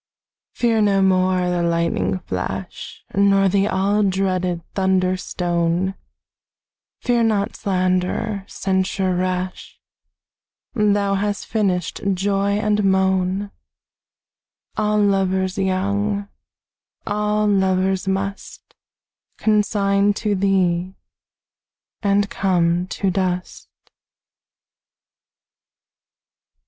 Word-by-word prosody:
Fear 230 -2 +2
no 200 -2 +3
more 185 -1 +2
the 175 -1 0
lightning 170 - 0
flash 95 +1 -6
Nor 195 0 +4
the 200 +1 +2
all 200 +2 +1
dreaded 185 -3 0
thunder 190 -1 +1
stone; 175 0 -1 1.1
Fear 240 -1 +1
not 215 -1 0
slander, 185 +1 -1
censure 190 0 -1
rash; 185 0 -3 0.9
Thou 205 -3 +2
hast 205 +1 -1
finished 190 -6 -1
joy 200 +1 0
and 210 0 +1
moan: 190 +1 +1 1.2
All 210 0 +1
lovers 190 -1 +1
young, 200 +2 -1 0.8
all 210 0 0
lovers 190 -1 +1
must 195 +1 -4 0.6
Consign 205 -1 +2
to 210 -1 -1
thee, 185 -2 +1 1.1
and 200 -1 +2
come 175 -3 +1
to 195 0 -1
dust. 180 -1 -3
195 Hz, 80 wpm, -21 LUFS, 185-205 Hz, 1.2 s, Nor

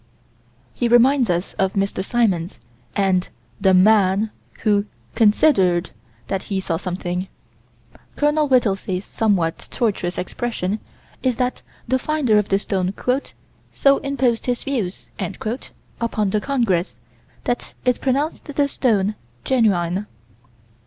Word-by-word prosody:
He 240 - 0
reminds 245 +1 +5
us 175 +1 -1
of 190 0 +2
Mr. 195 -1 -1
Symons, 195 -6 0 0.4
and 190 -3 +1 0.3
"the 190 -1 +4
man" 200 +1 +4 0.3
who 205 -1 +2 0.3
"considered" 205 - +3 0.4
that 195 - -1
he 195 -2 0
saw 170 -3 -1
something. 180 0 -3 0.9
Col. 295 +1 +2
Whittelsey's 195 -7 +1
somewhat 190 -7 0
tortuous 195 -7 -1
expression 210 0 -2 0.4
is 255 -2 +1
that 250 +1 -1 0.3
the 260 +2 +2
finder 255 -7 +2
of 205 - -2
the 195 - +3
stone 190 -1 -2 0.8
"so 275 0 +4
imposed 260 -5 0
his 245 -1 -1
views" 230 -10 -3 0.9
upon 215 -4 0
the 210 - +1
congress 225 -11 0 0.5
that 245 - -3
it 250 -1 +2
pronounced 275 +4 0
the 290 -1 0
stone 215 -7 +1 0.3
genuine. 200 -6 +1
210 Hz, 115 wpm, -21 LUFS, 190-250 Hz, 0.9 s, reminds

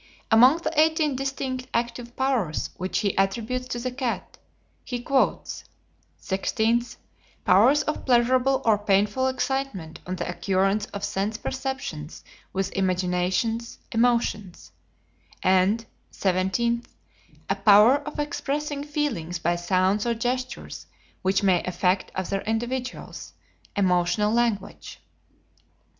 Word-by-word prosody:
Among 250 +7 +7
the 335 - -3
eighteen 315 -2 +3
distinct 265 -1 -3
active 235 +1 -2
powers 255 - 0
which 185 +1 -2
he 200 -3 0
attributes 230 +6 -1
to 245 - -3
the 250 +1 -3
cat, 250 -2 -4 0.4
he 245 -2 -4
quotes: 265 +2 0 0.6
"16th, 225 +5 0 0.5
powers 250 +11 +5
of 305 - -3
pleasurable 255 +2 +3
or 215 -2 +4
painful 205 +5 +2
excitement 260 -11 -2
on 185 - -2
the - - -4
occurrence 195 +3 0
of 200 - -7
sense 205 +3 -1
perceptions 260 - -5 0.3
with 195 0 -2
imaginations, 185 +5 0
emotions;" 230 -5 0 0.7
and 190 +5 +3 0.3
"17th, 200 +6 0 0.6
a - - +2
power 215 +6 +6
of 300 +1 -8
expressing 295 0 -2
feelings 280 - -2
by 170 +1 0
sounds 185 +5 +1
or 235 - +1
gestures 250 +2 -4 0.3
which 190 +2 +1
may 185 -3 +4
affect 180 +1 0
other 190 +1 -2
individuals, 240 +3 -4 0.4
emotional 185 +2 +2
language." 235 -3 -1
225 Hz, 110 wpm, -25 LUFS, 190-255 Hz, 0.7 s, Among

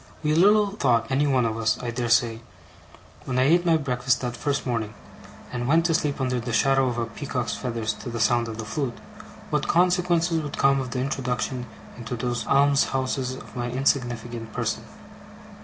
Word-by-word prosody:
We 150 0 +2
little 205 +5 +5
thought, 125 - +2
any 140 +2 +2
one 130 -3 +2
of 110 0 -1
us, 110 -1 +1
I 120 -1 -3
dare 120 0 -2
say, 115 -1 +2 0.8
when 130 -1 -2
I 130 - +4
ate 175 +5 +3
my 165 -1 +5
breakfast 125 -3 0
that 120 -1 -3
first 140 +1 -2
morning, 115 -4 -2 0.6
and 120 -1 -3
went 165 +4 +3
to 170 - +2
sleep 150 -3 0
under 125 -2 0
the 120 +1 -4
shadow 135 +2 +3
of 125 - -1
the 120 -1 -1
peacock's 120 -1 -4
feathers 115 -3 -2
to - - -6
the 115 0 -4
sound 120 +1 +2
of 110 -1 -6
the 110 - -5
flute, 130 +1 -3 0.5
what 150 -1 0
consequences 175 -2 +2
would 145 -2 -6
come 135 0 +3
of 130 - -5
the 125 - -3
introduction 125 -1 -2 0.3
into 120 +1 -5
those 120 -1 -3
alms 140 0 +4
houses 130 -1 -2
of - - -12
my 120 -1 -2
insignificant 120 -3 -1
person. - - -2
125 Hz, 190 wpm, -25 LUFS, 120-145 Hz, 0.8 s, little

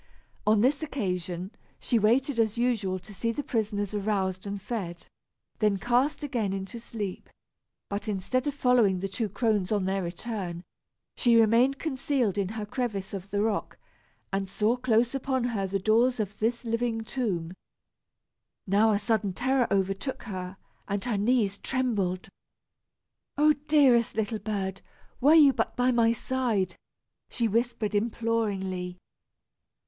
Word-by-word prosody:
On 215 -1 +5
this 275 +6 +2
occasion, 185 - -3 0.3
she 235 - +1
waited 245 +4 +2
as 220 0 +1
usual 225 -6 0
to 195 +3 -12
see 230 +4 -1
the 290 +5 -4
prisoners 210 -4 -1
aroused 195 -2 -1
and 200 0 -4
fed, 190 -5 -5 0.5
then 210 -2 +2
cast 245 - +1
again 235 -9 -1
into 195 +4 -5
sleep; 210 -4 -6 0.6
but 205 +2 -4
instead 215 +7 -1
of 285 - -1
following 245 -8 +3
the 195 - -2
two 205 +3 -2
crones 205 -2 0
on 205 -3 +1
their 195 +1 0
return, 175 -1 -5 0.5
she 240 -2 +3
remained 235 +5 +4
concealed 260 - -1
in 190 -2 0
her 215 0 -4
crevice 205 -4 -3
of 195 0 -6
the 205 +1 0
rock, 220 -2 -2 0.6
and 195 0 -1
saw 210 +4 +1
close 245 -1 +2
upon 265 -1 -1
her 220 -5 -1
the 195 +1 -1
doors 230 +5 +3
of 210 -1 -2
this 235 +2 -1
living 230 0 -1
tomb. 210 -8 -2 1.1
Now 210 +3 +4
a - - +3
sudden 210 -2 0
terror 260 +2 +1
overtook 195 +6 -1
her, 185 -3 -6 0.3
and 200 +1 -2
her 235 -4 0
knees 210 -2 +1
trembled. 205 -9 -1 1.1
"Oh, 300 +1 +5
dearest 265 -6 +4
little 220 0 -1
bird, 195 -2 -3 0.4
were 295 +5 +6
you 290 -4 +7
but - - -1
by 250 0 +3
my 230 -2 +4
side!" 230 -7 -1 0.5
she 235 -2 0
whispered 225 -1 0
imploringly. 205 -5 -1
215 Hz, 145 wpm, -28 LUFS, 195-245 Hz, 1.1 s, you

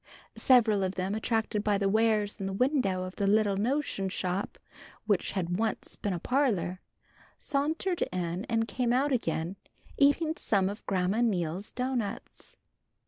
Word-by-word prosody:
Several 225 -6 +5
of 185 0 -2
them 190 +1 -2
attracted 220 -1 -1
by 210 -1 +2
the 195 0 +1
wares 215 0 +2
in 195 - -3
the 195 - -3
window 245 -6 +1
of 185 0 -7
the 200 - +1
little 205 -1 +3
notion 220 -3 -1
shop 185 +1 -2 0.5
which 205 -4 +1
had 180 -1 -1
once 225 -1 -2
been 205 - -3
a 180 - -1
parlor, 195 - 0 0.6
sauntered 315 +5 -1
in 180 +1 -2
and 225 -1 0
came 245 -1 0
out 275 +3 +2
again, 175 -6 -1 0.4
eating 300 +3 +4
some 195 -3 +1
of 205 - -7
Grandma 190 +3 +1
Neal's 185 -4 -1
doughnuts. 250 -4 -4
205 Hz, 150 wpm, -29 LUFS, 190-245 Hz, 0.6 s, Several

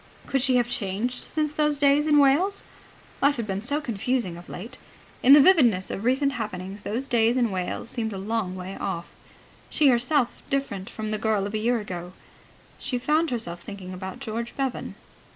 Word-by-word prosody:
Could 270 - 0
she 260 0 +3
have 240 -1 +3
changed 235 +2 -2
since 305 -1 -2
those 300 -1 +2
days 285 +1 +4
in 300 -1 +5
Wales? 300 +9 +3 0.6
Life 285 +1 +4
had 235 - -3
been 195 -1 -3
so 285 +6 0
confusing 235 - -2
of 175 +1 -12
late. 230 +8 -8 0.4
In 265 - +8
the 295 - +10
vividness 260 - +5
of 200 - -5
recent 270 +3 +2
happenings 205 -5 -5
those 235 +7 -2
days 235 -1 +2
in 240 -4 +2
Wales 185 +4 -3
seemed 225 -3 -2
a 195 - -5
long 200 -1 -2
way 185 +1 -6
off, 170 0 -3
and - - -23 0.6
she 295 -3 +5
herself 250 +1 +2
different 205 -9 -2
from 215 -1 -5
the 215 - -1
girl 215 -3 +1
of 205 - -5
a 215 - 0
year 240 +3 +2
ago. 180 -4 -6 0.7
She 250 - -2
found 310 +6 +1
herself 175 -8 -4
thinking 190 -2 -8
about 190 +1 -6
George 230 +2 -5
Bevan. 270 -2 -3
235 Hz, 190 wpm, -25 LUFS, 200-275 Hz, 0.7 s, the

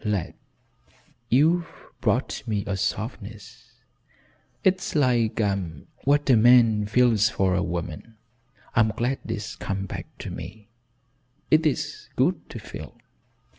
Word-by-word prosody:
Lad, 105 -6 -1 1.0
you've 165 +7 +3 0.3
brought - - 0
me 105 -3 -1
a 100 - -2
softness, 110 +1 -5 0.9
it's 190 -2 +1
like 120 -7 +2 0.7
what 145 +1 +3
a 130 - +6
man 115 -2 +5
feels 110 -2 +4
for 95 -3 +1
a 90 - +1
woman. 85 +4 -5 0.6
I'm 110 -1 +4
glad 120 +5 -1
it's 110 -2 -4
come 95 0 -3
back - - -6
to - - -6
me. 105 -1 -9 0.8
It 155 0 +5
is 150 - -3
good - - +1
to - - -7
feel. - - -9
110 Hz, 120 wpm, -25 LUFS, 105-125 Hz, 1.0 s, a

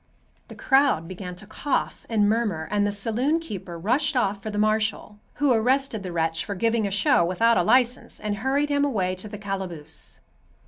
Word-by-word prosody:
The - - -11
crowd 265 - +3
began 185 0 -7
to 190 - -11
cough 265 +7 -2
and 215 -3 +3
murmur, 210 -8 0
and 205 0 +2
the - - 0
saloon 235 +10 0
keeper 195 - -7
rushed 265 - +1
off 200 -4 0
for 215 - -5
the 210 - -4
marshal, 215 0 0 0.2
who 285 -3 +3
arrested 245 0 +1
the 185 -2 -6
wretch 165 -1 0
for 200 - -5
giving 225 +1 +1
a - - -2
show 195 -3 +3
without 225 +7 +3
a - - +3
license 245 +5 +2
and 210 -1 -3
hurried 275 +6 0
him 285 0 +2
away 195 -10 0
to 185 +3 -7
the 210 - -7
calaboose. 190 -6 -4
210 Hz, 190 wpm, -25 LUFS, 190-245 Hz, 0.2 s, crowd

